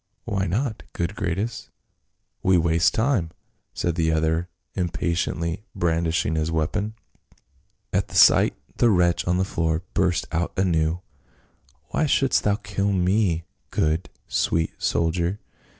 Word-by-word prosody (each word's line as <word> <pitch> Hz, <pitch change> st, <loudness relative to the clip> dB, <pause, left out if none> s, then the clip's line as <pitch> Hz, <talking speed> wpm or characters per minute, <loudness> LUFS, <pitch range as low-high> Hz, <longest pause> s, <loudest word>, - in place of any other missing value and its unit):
" -, -, -47 dB
Why 95 Hz, -1 st, -1 dB
not, 110 Hz, +5 st, -1 dB
good 90 Hz, +4 st, -2 dB
Gratus. 100 Hz, +4 st, -3 dB, 0.7 s
We 95 Hz, -1 st, +4 dB
waste 85 Hz, 0 st, +3 dB
time," 110 Hz, -8 st, +1 dB, 0.4 s
said 85 Hz, -, -1 dB
the 80 Hz, -1 st, +1 dB
other, 80 Hz, +2 st, 0 dB, 0.2 s
impatiently 85 Hz, 0 st, -1 dB
brandishing 80 Hz, -2 st, +1 dB
his 80 Hz, 0 st, 0 dB
weapon. 100 Hz, +7 st, -1 dB, 1.0 s
At -, -, +1 dB
the -, -, -11 dB
sight -, -, +6 dB, 0.2 s
the 120 Hz, -, +4 dB
wretch 90 Hz, -4 st, +2 dB
on 90 Hz, 0 st, +2 dB
the 95 Hz, -, +1 dB
floor 80 Hz, -2 st, -1 dB
burst 90 Hz, -2 st, +1 dB
out 85 Hz, +2 st, -1 dB
anew. 85 Hz, -2 st, +1 dB, 0.4 s
" -, -, -36 dB
Why 155 Hz, -, +1 dB
shouldst 135 Hz, -1 st, +2 dB
thou 105 Hz, -1 st, +3 dB
kill 100 Hz, -1 st, -2 dB
me, 90 Hz, -2 st, +2 dB, 0.3 s
good, 80 Hz, +3 st, 0 dB, 0.2 s
sweet 80 Hz, 0 st, 0 dB
soldier 85 Hz, +4 st, 0 dB
85 Hz, 135 wpm, -24 LUFS, 80-100 Hz, 1.0 s, sight